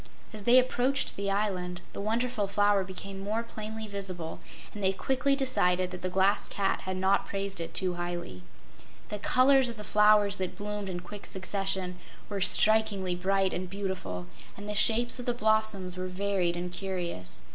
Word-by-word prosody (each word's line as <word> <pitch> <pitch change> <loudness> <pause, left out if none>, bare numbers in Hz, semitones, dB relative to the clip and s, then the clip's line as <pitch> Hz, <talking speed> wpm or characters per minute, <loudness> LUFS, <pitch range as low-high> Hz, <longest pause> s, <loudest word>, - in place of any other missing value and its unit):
As 210 -2 -7
they 245 +1 +7
approached 255 +1 +2
the 200 0 -2
island, 185 -3 -1
the - - -5
Wonderful 225 0 0
Flower 205 0 +3
became 195 +1 -7
more 215 +4 -2
plainly 220 -1 -6
visible, 185 -5 -5 0.3
and 205 - -7
they 190 0 +3
quickly 265 +6 +1
decided 185 -9 +1
that 180 - -7
the 185 - -2
Glass 190 +2 +2
Cat 195 -1 -1
had 185 0 -2
not 190 +1 +2
praised 195 -2 -3
it 165 - -6
too 185 -2 +1
highly. 175 - -5 0.7
The 210 - -4
colors 255 +3 +4
of 230 - -7
the 210 - -7
flowers 210 -1 +4
that 185 -1 -3
bloomed 205 -1 -4
in 175 -1 -4
quick 200 +3 -9
succession 190 -1 -2 0.3
were 200 -2 -3
strikingly 205 -1 +3
bright 190 +1 +1
and 180 0 -4
beautiful, 185 - -4 0.3
and 205 +1 -8
the 210 - -2
shapes 235 +4 +3
of 245 - -6
the 245 - +1
blossoms 215 -5 +2
were 185 0 -3
varied 185 -2 -1
and 175 0 -4
curious. 175 - -5
195 Hz, 175 wpm, -29 LUFS, 185-215 Hz, 0.7 s, they